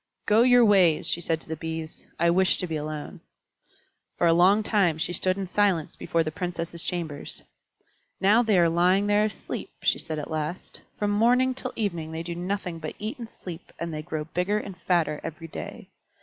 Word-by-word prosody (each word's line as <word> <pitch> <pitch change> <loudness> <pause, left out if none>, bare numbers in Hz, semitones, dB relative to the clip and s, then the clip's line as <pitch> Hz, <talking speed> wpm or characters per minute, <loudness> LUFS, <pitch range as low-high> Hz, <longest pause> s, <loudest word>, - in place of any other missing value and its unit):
"Go 215 +2 +5
your 245 -1 +6
ways," 185 -8 +4
she 165 +2 0
said 165 -1 0
to - - -11
the 160 - -3
Bees; 160 0 -6
"I 170 0 +4
wish 185 +2 +3
to - - -2
be 165 -2 -4
alone." 150 0 -5 1.0
For - - +2
a 165 - +5
long 190 +5 +5
time 195 -7 +2
she 175 +2 -2
stood 185 +1 +1
in 195 - -2
silence 185 -4 +1
before 165 -1 0
the 155 - -3
Princesses' 170 0 -4
chambers. 165 -5 -5 0.8
"Now 210 +5 +5
they 220 -5 +2
are 170 -1 +5
lying 180 +4 +3
there 205 +1 +3
asleep," 215 - -5
she - - +3
said 160 -1 -5
at 150 +1 -5
last. 155 +3 -4 0.2
"From 205 0 0
morning 245 +5 +3
till 255 0 -6
evening 170 -7 -3
they 165 +1 -4
do 170 0 -4
nothing 180 -1 -3
but 155 -1 -6
eat 215 +4 -5
and 230 -2 -7
sleep, 180 -5 -10
and 170 -1 -4
they 155 - -3
grow 155 0 -4
bigger 180 +6 -1
and 200 -3 -5
fatter 170 -4 0
every 165 +1 -6
day. - - -8
175 Hz, 200 wpm, -26 LUFS, 160-205 Hz, 1.0 s, your